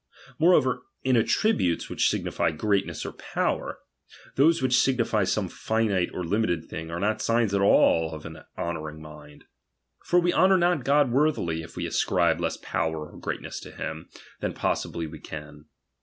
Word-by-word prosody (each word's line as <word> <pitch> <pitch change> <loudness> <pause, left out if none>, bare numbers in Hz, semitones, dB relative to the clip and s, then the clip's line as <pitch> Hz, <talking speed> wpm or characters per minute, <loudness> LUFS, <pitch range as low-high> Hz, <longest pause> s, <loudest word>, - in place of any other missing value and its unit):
Moreover, 130 -7 +4 0.2
in 130 -1 +3
attributes 115 - +1
which - - +1
signify - - 0
greatness 100 +5 -1
or - - -4
power, - - -2 0.6
those 160 +5 +4
which 130 -1 +3
signify 115 -6 +2
some 95 +1 0
finite 105 -2 0
or 90 - -4
limited 85 -3 0
thing, 80 +1 -7
are 85 +1 -4
not 105 +3 0
signs 115 -3 +1
at 100 - +2
all 80 -4 +4
of 75 - -10
an 80 0 -8 0.2
honouring 80 -2 -4
mind. 75 -1 -13 0.6
For 175 - +2
we 175 0 +1
honour 190 0 +5
not 175 -5 +2
God 140 -2 +3
worthily, 125 - +1
if 80 - -12
we - - -3
ascribe - - +1
less - - -1
power 80 -1 -3
or - - -12
greatness - - -5
to - - -10
him 80 +2 -6 0.3
than - - -2
possibly 85 - -2
we 75 - -9
can. 75 -1 -9
100 Hz, 165 wpm, -26 LUFS, 80-130 Hz, 0.6 s, honour